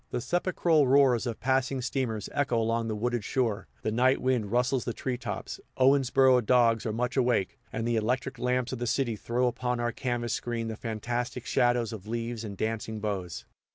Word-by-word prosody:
The -, -, -2 dB
sepulchral 170 Hz, -1 st, +2 dB
roars 130 Hz, -3 st, +4 dB
of 115 Hz, -, -4 dB
passing 130 Hz, +1 st, +1 dB
steamers 120 Hz, -4 st, -2 dB
echo 140 Hz, -4 st, +1 dB
along 115 Hz, 0 st, 0 dB
the 110 Hz, -, -2 dB
wooded 120 Hz, +1 st, -1 dB
shore, 115 Hz, -3 st, -1 dB, 0.2 s
the 110 Hz, -, 0 dB
night 130 Hz, +4 st, +3 dB
wind 125 Hz, -6 st, 0 dB
rustles 125 Hz, +1 st, +1 dB
the 120 Hz, -, -4 dB
tree 130 Hz, -2 st, -2 dB
tops, 120 Hz, -, -5 dB, 0.2 s
Owensboro 130 Hz, -1 st, +4 dB
dogs 115 Hz, -1 st, +3 dB
are -, -, 0 dB
much 120 Hz, +3 st, -2 dB
awake, 120 Hz, -7 st, +1 dB
and 115 Hz, +1 st, -2 dB
the 120 Hz, -1 st, +1 dB
electric 125 Hz, +3 st, -1 dB
lamps 125 Hz, 0 st, 0 dB
of 130 Hz, -, -4 dB
the 120 Hz, -, -2 dB
city 120 Hz, -2 st, 0 dB
throw 120 Hz, +4 st, -1 dB
upon 125 Hz, 0 st, -1 dB
our 120 Hz, 0 st, 0 dB
canvas 120 Hz, -2 st, -2 dB
screen 115 Hz, -2 st, -3 dB
the 110 Hz, -, -4 dB
fantastic 120 Hz, +3 st, -4 dB
shadows 120 Hz, -3 st, +1 dB
of 105 Hz, -2 st, -9 dB
leaves 115 Hz, 0 st, -3 dB
and 100 Hz, -3 st, -7 dB
dancing 110 Hz, 0 st, -3 dB
boughs. 90 Hz, -, -4 dB
120 Hz, 190 wpm, -28 LUFS, 115-130 Hz, 0.2 s, roars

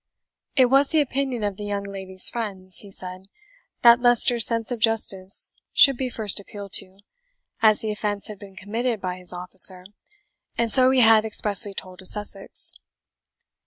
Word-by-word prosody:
"It 260 Hz, -, +4 dB
was 275 Hz, +3 st, +2 dB
the 320 Hz, -, +1 dB
opinion 265 Hz, -4 st, -3 dB
of 205 Hz, -2 st, -4 dB
the 210 Hz, -, -8 dB
young 200 Hz, -1 st, -4 dB
lady's 190 Hz, -1 st, +2 dB
friends," 195 Hz, -5 st, -2 dB
he 205 Hz, -, -7 dB
said, 185 Hz, 0 st, -6 dB, 0.6 s
"that 235 Hz, 0 st, +6 dB
Leicester's 240 Hz, -1 st, +3 dB
sense 230 Hz, 0 st, -3 dB
of 240 Hz, -, -4 dB
justice 210 Hz, -4 st, -1 dB, 0.2 s
should 275 Hz, -1 st, +5 dB
be 255 Hz, +1 st, -4 dB
first 215 Hz, -4 st, -2 dB
appealed 200 Hz, 0 st, -11 dB
to, 190 Hz, +1 st, -13 dB, 0.6 s
as 215 Hz, -2 st, +3 dB
the 220 Hz, -, -4 dB
offence 210 Hz, -1 st, -4 dB
had 210 Hz, -2 st, -7 dB
been 195 Hz, -2 st, -14 dB
committed 225 Hz, +4 st, -4 dB
by 180 Hz, -1 st, -6 dB
his 180 Hz, -1 st, -2 dB
officer, 180 Hz, +1 st, +4 dB, 0.7 s
and 230 Hz, -1 st, 0 dB
so 255 Hz, +3 st, +6 dB
he 260 Hz, -1 st, +2 dB
had 220 Hz, -1 st, +5 dB
expressly 210 Hz, -1 st, +1 dB
told 185 Hz, -1 st, -10 dB
to 190 Hz, -, -10 dB
Sussex." 205 Hz, -1 st, -3 dB
210 Hz, 165 wpm, -22 LUFS, 190-235 Hz, 0.7 s, that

